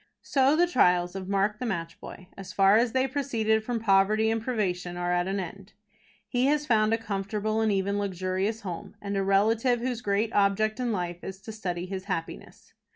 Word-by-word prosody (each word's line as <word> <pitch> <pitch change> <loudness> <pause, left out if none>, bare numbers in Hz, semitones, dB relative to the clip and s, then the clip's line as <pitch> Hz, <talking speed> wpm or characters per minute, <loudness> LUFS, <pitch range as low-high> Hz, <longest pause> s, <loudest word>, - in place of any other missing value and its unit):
So 275 +1 +3
the 345 +2 +4
trials 180 - +2
of 190 -1 -6
Mark, 200 +2 +1
the 250 - -3
Match 165 -5 -4
Boy, 180 - -11
as 195 0 -9
far 195 0 +5
as 235 +1 +3
they 260 0 +2
proceeded 230 -6 0
from 235 +1 -2
poverty 215 +1 +3
and 225 0 -1
privation, 180 -7 -2
are 175 0 -1
at 175 +1 +1
an 195 +1 -1
end. 195 +2 -8 0.5
He 245 +5 +1
has 295 +1 +1
found 215 -4 +3
a 225 - +3
comfortable 210 0 -2
and 220 -1 +2
even 200 +1 0
luxurious 190 +3 -2
home, 190 +1 -7
and 200 0 -4
a 195 - +1
relative 220 +5 +2
whose 245 -1 -3
great 210 +1 0
object 215 +3 +2
in 245 -2 -1
life 175 -3 -3
is 190 0 -7
to 220 - -8
study 180 -5 -4
his 190 0 -6
happiness. 165 0 -6
205 Hz, 200 wpm, -27 LUFS, 190-225 Hz, 0.5 s, far